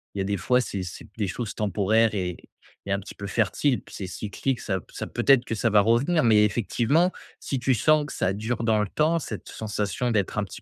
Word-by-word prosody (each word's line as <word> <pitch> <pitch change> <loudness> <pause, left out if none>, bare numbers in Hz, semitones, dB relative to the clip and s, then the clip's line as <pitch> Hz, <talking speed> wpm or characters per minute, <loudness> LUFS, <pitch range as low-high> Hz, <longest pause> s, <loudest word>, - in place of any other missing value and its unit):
il - - -5
y - - +1
a - - 0
des 100 +1 0
fois 125 +6 +2
c'est 100 -6 -3
c'est 90 0 -8
des 105 -3 0
choses 100 +5 -4
temporaires 110 +2 +2
et 90 -3 -2 0.5
et 100 - -4
un 100 - +1
petit 100 - -10
peu 100 - -7
fertiles 115 +6 +1
puis - - -13
c'est 95 - -5
cyclique, 110 +7 -3
ça 95 -2 -2
ça - - -5
peut - - -3
être 135 -3 +6
que 115 - -3
ça 115 +2 +1
va 105 -1 +5
revenir. 120 - +3
Mais 110 -2 +6
effectivement, 120 - +2 0.3
si 135 - -3
tu 130 +1 +1
sens 150 +6 +3
que 145 - -8
ça 95 +1 0
dure 115 +3 -3
dans 110 -2 +3
le 105 - -1
temps 155 +7 +2
cette 110 -8 -7
sensation 105 +2 -2
d'être 105 -4 0
un 105 - +1
petit 95 - -9
110 Hz, 245 wpm, -25 LUFS, 100-125 Hz, 0.5 s, être